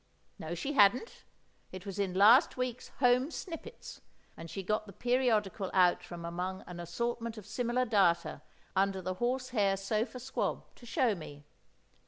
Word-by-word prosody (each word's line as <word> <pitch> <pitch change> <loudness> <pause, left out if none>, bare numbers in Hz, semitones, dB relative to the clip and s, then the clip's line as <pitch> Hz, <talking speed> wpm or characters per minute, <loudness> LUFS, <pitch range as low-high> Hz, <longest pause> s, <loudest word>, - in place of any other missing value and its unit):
No, 160 +2 -4
she 275 - -3
hadn't; 245 - +3 0.5
it 185 +1 -9
was 195 0 -6
in 190 -2 -1
last 220 +9 +6
week's 250 -1 -3
Home 250 +2 +4
Snippets, 360 +7 -8 0.3
and 165 0 -9
she 195 - -5
got 215 +3 -1
the 200 - -11
periodical 220 -5 +1
out 180 -1 +4
from 175 -1 -8
among 180 +2 -4
an 175 -1 -9
assortment 230 +6 -3
of 210 - -9
similar 245 +3 0
data 190 -7 +2 0.3
under 195 0 +2
the 185 0 -3
horse 255 +1 0
hair 200 -5 +2
sofa 215 +6 -2
squab, 260 +2 -2
to 240 - -15
show 230 0 +2
me. 145 -5 -9
210 Hz, 160 wpm, -32 LUFS, 185-245 Hz, 0.5 s, last